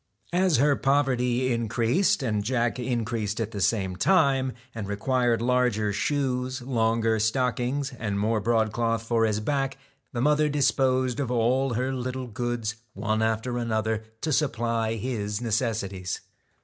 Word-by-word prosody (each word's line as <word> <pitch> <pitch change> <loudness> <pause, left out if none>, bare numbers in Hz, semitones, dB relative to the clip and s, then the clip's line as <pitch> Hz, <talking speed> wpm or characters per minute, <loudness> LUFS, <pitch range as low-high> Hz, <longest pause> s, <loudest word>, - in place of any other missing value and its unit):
As 180 -3 +3
her 145 +3 +4
poverty 130 -3 +1
increased, 115 - +1
and 105 -4 0
Jack 120 +1 0
increased 115 -4 -2
at 110 -1 -2
the 100 -3 -4
same 95 -3 +1
time, 135 - +3 0.2
and 110 -4 -5
required 115 +3 +1
larger 120 -4 +1
shoes, 130 +1 -1
longer 115 -2 +1
stockings, 125 +4 0
and 105 -2 -2
more 110 +1 +1
broadcloth 115 +1 +1
for 115 0 +2
his 105 -1 0
back, 135 +3 -1 0.3
the 120 - -4
mother 150 +3 +3
disposed 130 -2 +1
of 135 -4 -1
all 125 +2 +1
her 130 +3 -1
little 130 0 -3
goods 120 -1 -3 0.2
one 110 +2 -1
after 110 +2 0
another, 110 -1 -1 0.2
to 155 - 0
supply 115 -5 0
his 105 -3 -3
necessities. 110 -6 -2
120 Hz, 135 wpm, -26 LUFS, 110-130 Hz, 0.3 s, her